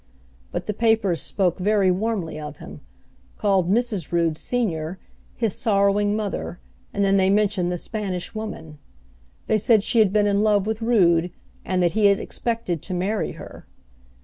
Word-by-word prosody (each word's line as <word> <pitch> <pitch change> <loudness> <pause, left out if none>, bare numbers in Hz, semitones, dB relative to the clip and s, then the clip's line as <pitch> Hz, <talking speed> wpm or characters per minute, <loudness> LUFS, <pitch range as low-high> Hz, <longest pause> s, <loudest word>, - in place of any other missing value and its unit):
But - - -4
the 210 - -2
papers 220 -6 +1
spoke 190 -2 0
very 195 -1 +3
warmly 190 -5 -2
of 150 -1 -7
him; - - -11 0.6
called 195 -4 +1
Mrs. 215 - 0
Rood, 170 -2 +1
Senior, 180 -6 -2 0.4
his 225 -5 -1
sorrowing 205 0 +2
mother, 205 -4 -4 0.3
and 200 0 0
then 195 0 +3
they 190 0 +3
mentioned 200 -3 +1
the 175 - -2
Spanish 190 -2 -4
Woman. 210 -9 -7 0.7
They 215 - +2
said 220 0 +3
she 230 - +1
had 210 -4 +4
been 210 0 +3
in 200 0 +2
love 210 -2 +3
with 220 +1 -3
Rood, 180 -7 +3 0.3
and 185 -1 0
that 175 - +3
he 215 +1 +3
had 200 -1 +3
expected 225 -9 -3
to 185 - -4
marry 200 +4 -1
her. - - -12
200 Hz, 165 wpm, -23 LUFS, 180-215 Hz, 0.7 s, had